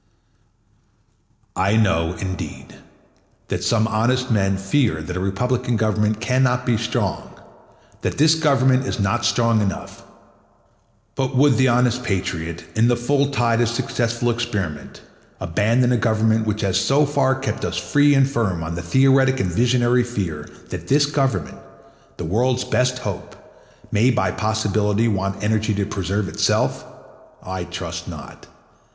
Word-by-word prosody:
I 100 +4 +1
know, 90 -6 +1
indeed, 95 +1 -6 0.8
that - - -2
some 110 -1 +2
honest 125 +4 0
men 95 -3 +1
fear 95 - 0
that 85 +3 -6
a - - -2
republican 125 +5 -1
government 110 0 0
can 125 +2 0
not 125 -1 +1
be 120 - +2
strong, 110 -3 -3 0.7
that - - -3
this 155 +2 +5
Government 135 -4 +2
is - - -3
not 100 +3 0
strong 115 +2 +2
enough; 100 -2 -4 1.1
but 135 0 -2
would 140 0 +4
the 130 0 +4
honest 125 0 +2
patriot, 85 -5 -3
in 110 +2 +3
the 120 -1 +2
full 140 +3 +1
tide 120 -4 +1
of 120 - +2
successful 120 0 -1
experiment, 105 -10 -4 0.4
abandon 110 +8 +1
a 125 - +3
government 110 -1 +1
which 105 0 -1
has 95 -1 +1
so 140 +7 +3
far 140 -2 +1
kept 130 0 -4
us - - -2
free 145 0 +3
and 135 -1 +4
firm 110 - -1
on 80 +1 -4
the 85 - -4
theoretic 130 +6 +3
and 90 -5 -1
visionary 120 +4 +2
fear 90 -11 -4 0.2
that - - -7
this 145 +2 +4
Government, 135 - -2 0.6
the - - -5
world's 125 +8 +1
best 125 0 0
hope, 105 -7 -6 0.6
may 115 +5 +3
by 125 - +1
possibility 105 0 0
want 100 -1 -2
energy 110 0 0
to 100 0 -1
preserve 100 0 -2
itself? - - 0 0.6
I 95 -1 -5
trust - - -6
not. - - -10
115 Hz, 145 wpm, -21 LUFS, 100-125 Hz, 1.1 s, this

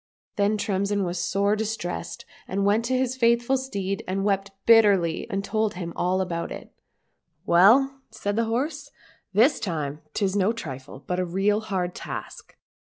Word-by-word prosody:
— - - -63
Then 205 +1 +2
Tremsin 200 0 0
was 175 0 -3
sore 200 +3 +1
distressed, 210 - -4 0.2
and 195 +1 -1
went 210 +3 +2
to 255 +1 +1
his 255 0 0
faithful 235 +1 +3
steed 200 -7 -3
and 195 +1 -1
wept 200 -1 0 0.2
bitterly, 200 -8 +4
and 195 0 -2
told 215 0 -1
him 170 -2 -5
all 185 +1 +1
about 170 -2 -3
jit. - - -9 0.4
" 165 +1 -48
Well," 270 +9 +5
said 205 0 -3
the 230 +1 +1
horse, 250 +8 -2 0.2
" - - -35
this 270 +6 +4
time 155 -7 -3
'tis 195 -1 0
no 205 +2 +2
trifle, 135 - -8
but 180 0 -2
a - - +1
real 195 +4 +1
hard 185 -5 -2
task. - - -8
200 Hz, 170 wpm, -25 LUFS, 180-225 Hz, 0.4 s, Well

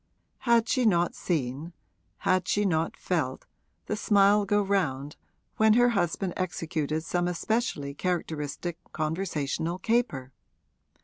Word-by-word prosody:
Had 235 -1 +5
she 255 +2 +1
not 175 -6 +3
seen 150 0 -3 0.5
had 185 -1 +1
she 205 0 +1
not 165 -3 0
felt 155 -8 -2 0.4
the - - -2
smile 205 -1 +4
go 205 +1 +2
round 150 -8 -1 0.4
when 220 0 +5
her 245 +2 +5
husband 180 -3 0
executed 160 -4 -2
some 175 +1 0
especially 180 -6 -1
characteristic 165 0 -3
conversational 160 0 -2
caper? 185 - -1
175 Hz, 115 wpm, -28 LUFS, 155-205 Hz, 0.5 s, Had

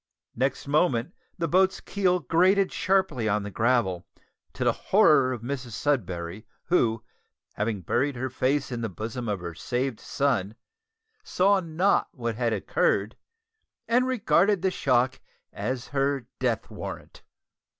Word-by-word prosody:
Next 130 +2 -1
moment 145 0 +1 0.2
the 170 -2 -1
boat's 190 +4 +3
keel 180 -3 0
grated 185 +7 +3
sharply 185 - +1
on 105 0 +1
the 100 - -6
gravel, 110 -6 +1 0.5
to - - -3
the - - +4
horror 150 -11 +4
of 120 -3 -5
Mrs 125 -2 -5
Sudberry, 95 -7 -2 0.2
who, 115 -10 +1 0.5
having 105 -1 -2
buried 135 - 0
her 130 +1 -3
face 135 +2 0
in 120 -1 -3
the 115 - -2
bosom 110 +5 -5
of 100 -3 -2
her 85 -1 -5
saved 125 - -2
son, 115 -7 -1 0.7
saw 195 +2 +3
not 175 +3 +1
what 120 -3 -3
had 115 +1 -1
occurred, 105 0 0 0.7
and 250 +3 +3
regarded 205 -6 +2
the 190 - +2
shock 130 -4 +1 0.3
as 130 0 -4
her 140 -2 0
death - - -1
warrant. - - -8
130 Hz, 140 wpm, -26 LUFS, 115-175 Hz, 0.7 s, the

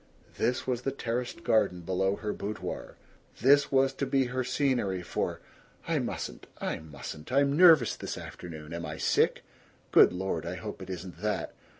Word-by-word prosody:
This 125 +1 0
was 125 -2 -1
the 135 - -1
terraced 125 -2 -3
garden 90 -5 +2
below 95 +2 0
her 105 0 -3
boudoir; 105 +2 -5 0.5
this 140 +2 +5
was 135 0 +3
to 135 0 -2
be 135 0 +3
her 130 0 0
scenery 120 -10 0
for - - -2 0.5
"I - - +1
mustn't! - - -5
I - - -3
mustn't! 75 - -9
I'm 140 +1 +3
nervous 160 - +7
this - - -5
afternoon. 80 -2 -8
Am 85 0 -4
I 75 0 -5
sick?... - - +2 0.5
Good - - +7
Lord, 90 -2 -2
I 85 +2 -4
hope 90 - -7
it 95 - -8
isn't 90 -1 -7
that! 105 -5 -1
105 Hz, 170 wpm, -29 LUFS, 90-135 Hz, 0.5 s, nervous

